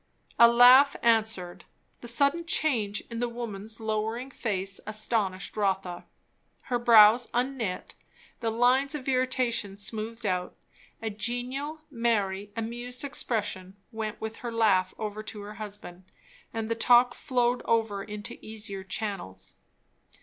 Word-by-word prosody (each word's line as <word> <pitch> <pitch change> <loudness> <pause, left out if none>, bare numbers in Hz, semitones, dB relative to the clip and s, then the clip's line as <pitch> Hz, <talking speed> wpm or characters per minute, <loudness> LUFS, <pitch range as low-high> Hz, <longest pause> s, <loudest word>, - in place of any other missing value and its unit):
A 235 - +10
laugh 250 +4 +7
answered. 220 -6 +1 0.4
The 240 - -10
sudden 280 +8 +1
change 225 -12 0
in 230 - -4
the 245 0 -1
woman's 225 -2 -6
lowering 220 +4 -2
face 195 -6 -3
astonished 215 -3 -2
Rotha. 190 -4 -1 0.6
Her 245 -2 -2
brows 230 0 +7
unknit, 245 -6 -2 0.5
the 230 - -1
lines 255 +5 +3
of 275 -3 -6
irritation 255 -6 0
smoothed 220 +2 -4
out, 180 -2 -1 0.5
a 220 - -2
genial, 250 +8 -3
merry, 205 -5 0
amused 240 +3 -3
expression 205 -9 -3 0.2
went 220 -2 -5
with 220 0 -5
her 240 - -5
laugh 200 -5 +3
over 215 -1 -4
to 215 -1 -8
her 205 +1 -8
husband; 200 -3 -8 0.5
and 225 -1 -3
the 230 - 0
talk 240 +1 +5
flowed 245 -1 0
over 220 -3 0
into 210 -1 -7
easier 210 -3 -5
channels. 190 - -5
225 Hz, 130 wpm, -28 LUFS, 205-245 Hz, 0.6 s, A